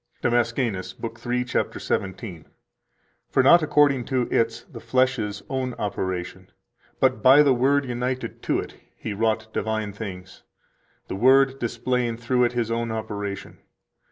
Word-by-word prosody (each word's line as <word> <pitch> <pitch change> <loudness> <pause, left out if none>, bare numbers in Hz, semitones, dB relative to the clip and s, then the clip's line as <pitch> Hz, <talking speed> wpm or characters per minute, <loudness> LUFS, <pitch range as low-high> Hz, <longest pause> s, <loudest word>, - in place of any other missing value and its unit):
137 120 0 +1
DAMASCENUS, 95 0 -7
(lib. 115 -1 -5
3, 125 +1 -1
cap. 125 - -2
17): 95 -3 -4 0.8
"For 130 - +3
not 170 +6 +7
according 145 -4 +3
to 130 -2 0
its 115 0 0
[the - - -11
flesh's] 115 -4 0
own 130 -2 -3
operation, 95 -2 -4 0.5
but 105 - +2
by 135 +6 +7
the 140 -2 +4
Word 135 +3 +2
united 125 +1 -3
to - - 0
it, - - -6 0.2
He 110 - -5
wrought 110 +1 0
divine 110 -2 -2
things, 95 -3 -8 0.7
the - - -4
Word 135 +5 +4
displaying 120 0 -1
through 125 +1 +1
it 120 - -1
His 120 -2 -1
own 115 0 -1
operation. 105 -3 -5
115 Hz, 145 wpm, -24 LUFS, 105-130 Hz, 0.8 s, not